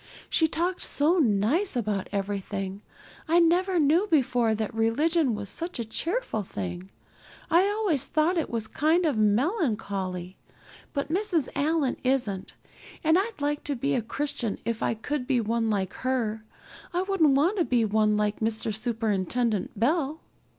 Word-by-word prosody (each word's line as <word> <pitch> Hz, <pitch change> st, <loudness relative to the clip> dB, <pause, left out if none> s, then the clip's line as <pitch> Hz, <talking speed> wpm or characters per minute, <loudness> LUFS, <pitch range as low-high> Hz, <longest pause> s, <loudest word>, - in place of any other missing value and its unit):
She 320 Hz, -, +4 dB
talked 350 Hz, +4 st, -1 dB
so 320 Hz, +6 st, +2 dB
nice 260 Hz, -, +2 dB
about 210 Hz, -5 st, -1 dB
everything. 195 Hz, -1 st, -3 dB, 0.5 s
I 330 Hz, +2 st, +3 dB
never 355 Hz, +2 st, +3 dB
knew 325 Hz, +6 st, +3 dB
before 245 Hz, -7 st, +2 dB
that 220 Hz, +2 st, -3 dB
religion 260 Hz, +5 st, +2 dB
was 205 Hz, -1 st, -5 dB
such 335 Hz, -, -4 dB
a 235 Hz, -, -3 dB
cheerful 335 Hz, -, -1 dB
thing. 95 Hz, -, -6 dB, 0.6 s
I 350 Hz, +4 st, +5 dB
always 410 Hz, -, 0 dB
thought 315 Hz, +4 st, +2 dB
it 330 Hz, -, -1 dB
was 230 Hz, -2 st, -2 dB
kind 315 Hz, +9 st, +1 dB
of 300 Hz, -5 st, +1 dB
melancholy, 210 Hz, -, 0 dB, 0.6 s
but 280 Hz, -1 st, -2 dB
Mrs. 345 Hz, -4 st, 0 dB
Allan's 290 Hz, -1 st, +1 dB
isn't, 245 Hz, -8 st, -1 dB, 0.5 s
and 320 Hz, 0 st, +4 dB
I'd 395 Hz, -2 st, -1 dB
like 290 Hz, +1 st, -1 dB
to 285 Hz, -, -1 dB
be 140 Hz, -, -1 dB
a -, -, +1 dB
Christian 240 Hz, -2 st, -2 dB
if 230 Hz, -1 st, -2 dB
I -, -, 0 dB
could 250 Hz, +3 st, -3 dB
be 260 Hz, -3 st, +2 dB
one 225 Hz, 0 st, 0 dB
like 190 Hz, -3 st, -1 dB
her. 230 Hz, -4 st, -2 dB, 0.5 s
I 355 Hz, +1 st, +1 dB
wouldn't 350 Hz, -8 st, +3 dB
want 345 Hz, +9 st, +2 dB
to 340 Hz, -, +3 dB
be 240 Hz, -3 st, +2 dB
one 215 Hz, 0 st, +2 dB
like 210 Hz, 0 st, 0 dB
Mr. 220 Hz, 0 st, -1 dB
Superintendent 220 Hz, -1 st, -1 dB
Bell." 300 Hz, +4 st, +1 dB
250 Hz, 155 wpm, -27 LUFS, 215-325 Hz, 0.6 s, I